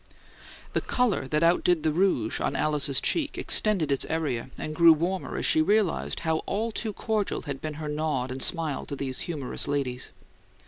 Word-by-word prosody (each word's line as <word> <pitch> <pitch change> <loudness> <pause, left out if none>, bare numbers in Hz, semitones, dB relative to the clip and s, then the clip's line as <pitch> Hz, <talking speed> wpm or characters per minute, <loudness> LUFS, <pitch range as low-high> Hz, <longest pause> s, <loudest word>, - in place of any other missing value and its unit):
The - - +1
colour 245 - 0
that 150 +3 0
outdid 170 -1 +3
the 155 - +2
rouge 160 - +1
on 140 - -1
Alice's 145 -2 +2
cheek 305 -4 -1
extended 190 -9 +1
its 135 - +2
area 140 -7 -2
and 155 - -5
grew 170 0 +7
warmer 175 +4 -2
as - - -1
she 155 - +5
realized 205 +1 +1
how 160 -1 0
all 225 +3 -1
too 220 0 -3
cordial 210 0 -2
had 140 -3 -6
been 155 -1 -5
her 155 0 -6
nod 150 -4 -2
and 130 +1 -5
smile 160 -3 0
to 140 - -4
these 130 -2 -1
humorous 145 -7 -3
ladies. 135 -3 -2
155 Hz, 180 wpm, -27 LUFS, 140-185 Hz, -, grew